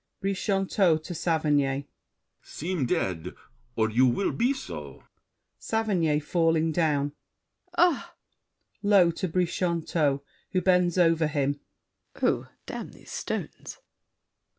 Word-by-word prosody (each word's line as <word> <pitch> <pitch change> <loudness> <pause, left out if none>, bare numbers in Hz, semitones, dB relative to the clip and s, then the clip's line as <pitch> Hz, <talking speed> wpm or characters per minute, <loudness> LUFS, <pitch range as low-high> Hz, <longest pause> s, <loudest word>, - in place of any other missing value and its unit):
BRICHANTEAU 195 -3 +2
(to 175 - -6
Saverny). 145 -4 +1 0.6
Seem 165 -4 -3
dead, 90 -5 -2 0.4
Or 110 -1 +2
you 125 +4 +4
will 160 +11 +1
be 240 +3 +1
so! 75 - -7 0.6
SAVERNY 185 -9 +1
(falling 165 0 +2
down). 150 -4 +1 0.7
Ah! 350 -4 +2 0.7
[Low 200 -4 +5
to 185 +3 -3
Brichanteau, 170 -4 0 0.3
who 185 - +2
bends 180 -1 +3
over 165 -2 +4
him. 145 -1 -1 0.6
Oh, - - +1 0.2
damn - - -6
these - - -14
stones. - - -5
165 Hz, 105 wpm, -27 LUFS, 145-185 Hz, 0.7 s, Low